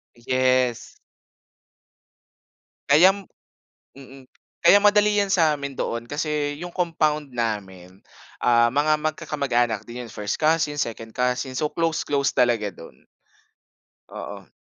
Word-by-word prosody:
Yes. 130 0 0 2.0
Kayam 190 +7 +5 0.7
mm. 135 -1 -14 0.3
Kaya 170 +4 +7
madali 205 0 +4
'yan 200 -1 +1
sa 160 -5 +3
amin 140 -1 -6
doon 115 -3 -4
kasi 145 +2 -3
'yung 175 - -5
compound 155 -5 -1
namin, 95 -6 -4 0.5
ah, 120 -1 +4
mga 150 +4 +1
magkakamag-anak 125 -8 -1
din 120 +1 -7
yun. 115 - -12
First 105 -3 -3
cousin, 155 -1 +1
second 115 -4 -5
cousin, 125 +1 -1
so, 150 -1 -1
close 165 -1 -1
close 140 -1 0
talaga 120 -5 +2
do'n. 80 -8 -14 1.0
Oo. - - -9
140 Hz, 115 wpm, -23 LUFS, 120-155 Hz, 2.0 s, Kaya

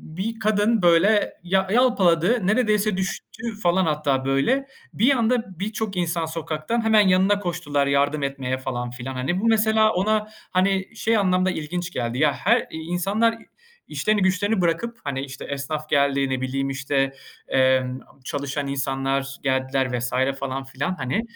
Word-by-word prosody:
bir 225 +5 -3
kadın 215 0 +2
böyle 180 +5 +4
yal 190 +1 +1
yalpaladı, 200 -4 +3
neredeyse 215 -3 +2
düştü, 195 +3 -5 0.2
falan, 180 +1 +3
hatta 145 -4 0
böyle. 190 - +1 0.3
Bir 255 +7 +3
anda 225 -6 -1
birçok 210 -1 -3
insan 170 -1 0
sokaktan 160 +7 -3
hemen 215 -3 +5
yanına 190 +2 +3
koştular 145 -7 -1
yardım 140 +1 +1
etmeye, 135 -2 -2
falan 125 -2 -4
filan. 125 +2 -6
Hani, 135 +9 -1
bu, - - -1
mesela, 220 0 +4
ona, 215 +3 +1 0.2
hani, 190 +4 0
şey 225 0 +1
anlamda 185 -1 +2
ilginç 175 +2 -4
geldi, 120 -3 -3
ya, 150 0 +3
her 235 +6 +1
insanlar 185 +8 0 0.5
işlerini 215 -2 0
güçlerini 190 +2 +1
bırakıp, 230 +8 -1
hani, 135 -2 -3
işte, 135 -1 -8
esnaf 150 +2 -4
geldi, 140 -1 +2
ne 130 -1 -2
bileyim, 135 +1 -2
işte, 135 0 -1 0.3
emm, 130 -1 +2 0.2
çalışan 140 +1 -3
insanlar 135 0 -2
geldiler 130 -1 0
vs. 120 +1 -3 0.3
falan 135 0 -3
filan, 135 +7 -3
hani, 130 - -1
170 Hz, 145 wpm, -23 LUFS, 135-205 Hz, 0.5 s, hemen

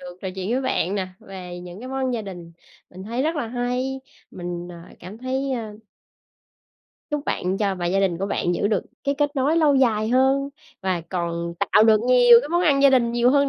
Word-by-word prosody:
được 180 0 -10
trò 190 - -3
chuyện 190 +2 -4
với 255 - +1
bạn 200 -7 0
nè, 190 -2 -2
về 180 -2 -9
những 180 +2 -10
cái 255 - -8
món 265 - -5
ăn 260 -1 0
gia 225 - -3
đình. 175 -4 -9 0.4
Mình 185 +1 -10
thấy 235 +6 -3
rất 320 +2 -1
là 285 - -2
hay. 250 +2 -2 0.3
Mình, 175 -1 -6
à, 170 0 -13
cảm 190 +5 -10
thấy, 265 +2 -2
ơ 220 -4 -5 1.3
Chúc 295 0 -2
bạn 185 +2 -1
cho 200 -2 0
và 175 -1 -3
gia 195 +3 +1
đình 185 -4 0
của 195 - -2
bạn 175 -3 -1
giữ 200 - 0
được 210 -3 0 0.2
cái 280 - +1
kết 290 0 0
nối 280 +5 +2
lâu 305 -4 +4
dài 220 -5 +2
hơn 265 +3 +2 0.3
và 190 -3 -1
còn 170 -1 -3 0.2
tạo 210 - +6
được 220 -1 +5
nhiều 245 -1 +7
cái 285 - -7
món 345 +2 +1
ăn 280 -5 +3
gia 280 - +7
đình 235 -3 +3
nhiều 240 +1 +3
hơn 280 0 +3
225 Hz, 225 wpm, -23 LUFS, 185-265 Hz, 1.3 s, nhiều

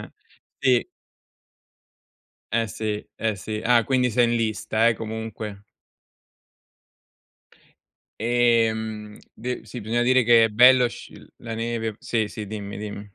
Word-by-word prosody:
eh, - - -14 0.5
sì. 125 -2 +3 1.7
Eh 115 0 +1
sì, 105 0 -4
eh 110 -2 -2
sì. 105 +3 -5
Ah, 120 -1 +4
quindi 130 -2 +1
sei 120 +2 +3
in 120 0 +1
lista, 110 0 +1
eh, 115 - +2
comunque. 110 -2 -6 2.6
Ehm, 110 -3 +1 0.2
de 125 +1 -5
sì, 115 +2 -8
bisogna 115 +3 0
dire 130 +1 +4
che 115 -1 +6
è - - +2
bello 125 +3 +6
sc - - -11
uhm, - - -15
la 115 -1 -6
neve. 115 -1 -3
Sì, 110 -3 -1
sì, 105 0 -7
dimmi, 100 -1 -6
dimm 105 0 -6
115 Hz, 130 wpm, -24 LUFS, 110-120 Hz, 2.6 s, che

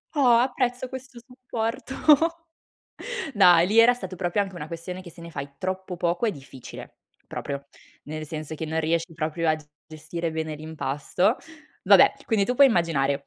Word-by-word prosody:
Oh, 285 - +2 0.2
apprezzo 250 0 0
questo 260 -1 -9
supporto. 250 +1 -5 1.4
Dai, 175 -4 +6
lì 215 +4 +2
era 235 +2 +8
stato 190 -6 -7
proprio 180 +3 0
anche 195 -2 -3
una 150 -3 -6
questione 180 +2 -7
che 175 - -11
se 170 +1 -15
ne 170 - -9
fai 140 -2 -7
troppo 185 0 -4
poco 175 +6 0
è - - +2
difficile, 135 - -11 0.3
proprio. 140 -1 -5 0.4
Nel 155 +1 -6
senso 155 0 -6
che 160 - -5
non 160 +1 -2
riesci 165 +1 -1
proprio 160 +1 -2
a 155 - +4
g 155 - -14 0.2
gestire 160 +2 -5
bene 160 -1 -3
l'impasto. 155 - -1 0.5
Vabbè, - - +7
quindi 215 -4 +2
tu 250 - 0
puoi 280 +2 +7
immaginare 140 - 0
170 Hz, 165 wpm, -25 LUFS, 155-220 Hz, 1.4 s, era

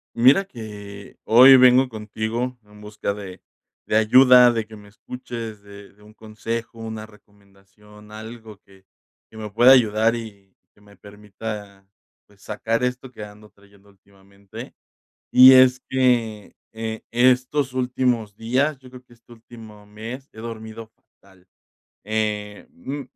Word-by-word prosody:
Mira 130 +11 +4
que, 105 - -11
hoy 130 +4 +7
vengo 130 +1 +5
contigo 115 +2 -5
en 105 0 -18
busca 105 -1 -5
de 95 -3 -10 0.5
de 105 - +1
ayuda, 125 +2 +6
de 115 -2 -3
que 110 - -13
me 105 -1 -15
escuches, 115 -1 -9
de 100 0 -15
de 105 - -24
un 105 +1 -18
consejo, 115 +2 -7
una 110 -1 -7
recomendación, 105 0 -21
algo 110 0 -11
que 95 -1 -23 0.5
que 110 - -15
me 110 -1 -7
pueda 120 +5 +5
ayudar 115 -2 +3
y 100 -4 -11 0.2
que 105 - -26
me 100 -1 -20
permita, 105 -1 -10 0.4
pues, 100 -1 -26
sacar 115 +2 -3
esto 125 +1 -3
que 115 -4 -11
ando 105 +1 -14
trayendo 100 0 -24
últimamente, 100 0 -15 0.6
y 130 +1 +9
es 130 0 +5
que, 120 -5 -1 0.2
eh, 110 0 -6
estos 130 +3 +1
últimos 125 -4 -2
días, 130 +6 -1
yo 130 -1 -17
creo 125 0 -13
que 125 -1 -22
este 120 0 -22
último 110 -2 -15
mes, 115 +6 -9
he - - -18
dormido 110 -1 -9
fatal, 95 -4 -27 0.6
eh, 105 -1 -4
mm, 140 +11 -7
110 Hz, 145 wpm, -21 LUFS, 105-125 Hz, 0.6 s, y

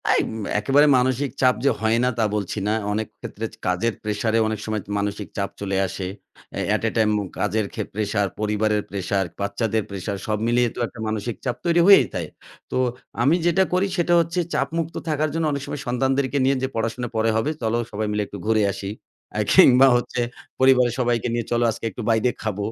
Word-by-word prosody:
তাইম - - +2 0.3
একেবারে 140 +7 +4
মানসিক 130 +1 +1
চাপ 130 -1 +5
যে - - +6
হয় 110 +1 +2
না 125 - +3
তা - - +3
বলছি 105 0 -2
না। 105 - +2 0.2
অনেক 110 0 -2
ক্ষেত্রে - - -6
চে - - -15
কাজের 90 +6 +1
প্রেশার 105 +1 -1
এ - - +4
অনেক 110 -1 -2
সময় 110 -1 -2
তো - - -19
মানসিক 100 0 -3
চাপ 100 -1 -1
চলে 100 -1 -1
আসে। 95 0 -5 0.5
অ্যা - - -3
at - - -3
a - - +2
time 110 -1 +3
উম 100 - -5
কাজের 105 +1 0
খে - - -2
প্রেশার, 105 -1 0
পরিবারের 105 0 +1
প্রেশার, 100 0 -1 0.2
বাচ্চাদের 110 +2 -1
প্রেশার 100 +1 -4
সব 110 -1 0
মিলিয়ে 120 0 +3
তো - - -7
একটা 115 - -14
মানসিক 110 +1 -3
চাপ 125 - 0
তৈরি 170 0 +4
হয়েই 195 -10 +8
যায়। 85 -3 -3 0.4
তো - - -1 0.5
আমি 145 +6 +4
যেটা 175 +2 +4
করি 185 +2 +2
সেটা 175 0 +2
হচ্ছে 170 +2 0
চাপমুক্ত 165 +4 -1
থাকার 155 0 +1
জন্য 165 0 0
অনেক 140 -1 -2
সময় 145 - -5
সন্তানদেরকে 135 +2 0
নিয়ে 135 +1 +3
যে - - +2
পড়াশোনা 115 +2 -2
পরে 110 +1 +2
হবে। 110 +7 +1
চলো 115 0 0
সবাই 105 0 -2
মিলে 105 0 0
একটু 100 - -8
ঘুরে 110 -1 +3
আসি। 100 0 -6 0.4
অ্যা - - 0
কিংবা 130 +1 +7
হচ্ছে 120 0 -1 0.4
পরিবারের 130 -2 +5
সবাইকে 120 -2 +1
নিয়ে 120 -1 -1
চলো 120 0 +2
আজকে 110 - -7
একটু 120 - -7
বাইরে 115 +2 +3
খাব। 110 -3 -2
115 Hz, 205 wpm, -23 LUFS, 105-130 Hz, 0.5 s, হয়েই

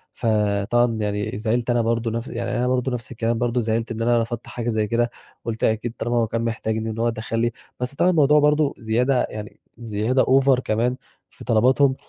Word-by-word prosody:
فطبعًا 110 +2 +1
يعني 105 0 -2
زعلت 115 +2 -1
أنا 120 -1 +3
برضه 115 0 0
نفس 115 +3 -3
يعني 120 0 -4
أنا 125 +1 +1
برضه 130 +1 0
نفس 120 -1 -5
الكلام 115 -1 -1
برضه، 120 0 0
زعلت 115 +1 -1
إن 115 0 -4
أنا 120 0 +3
رفضت 115 0 -5
حاجة 120 -1 -4
زي 110 -2 0
كده، 120 +2 +1 0.4
قُلت 115 -1 -4
أكيد 110 +1 0
طالما 120 0 -1
هو 115 -1 +2
كان 115 +1 -2
محتاجني 110 -1 -2
إن 110 - -5
هو 120 +1 +2
دخل 115 0 -3
لي، 120 +1 +1 0.3
بس 125 +2 -4
طبعًا 180 - +3
الموضوع 150 -3 +5
برضه 150 0 +3
زيادة 125 +4 +1
يعني، 105 +1 -8 0.2
زيادة 115 +3 0
OVER 135 -1 +4
كمان 120 +2 0 0.3
في - - -14
طلباتهم، 130 +4 +3
115 Hz, 200 wpm, -23 LUFS, 110-125 Hz, 0.4 s, الموضوع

